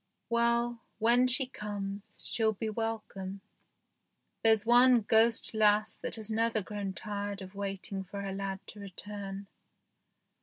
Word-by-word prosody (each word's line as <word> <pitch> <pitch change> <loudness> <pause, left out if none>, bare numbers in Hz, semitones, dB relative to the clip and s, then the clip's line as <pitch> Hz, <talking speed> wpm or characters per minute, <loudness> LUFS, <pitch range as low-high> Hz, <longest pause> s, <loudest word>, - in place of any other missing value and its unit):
Well, 235 0 +2 0.2
when 240 +3 +4
she 260 +2 +5
comes, 205 -4 -6
she'll 220 -1 +1
be 220 +2 -3
welcome. 210 -3 -4 1.0
There's 220 -1 +4
one 245 +1 +6
ghost 225 +2 +3
lass 215 0 +3
that - - -2
has 220 -1 -3
never 225 -1 +1
grown 200 -1 -4
tired 205 0 -4
of 190 0 -9
waiting 195 -1 -4
for 200 +2 -7
her 195 -1 -3
lad 195 0 -4
to 210 - -11
return. 200 0 -7
210 Hz, 130 wpm, -31 LUFS, 200-230 Hz, 1.0 s, one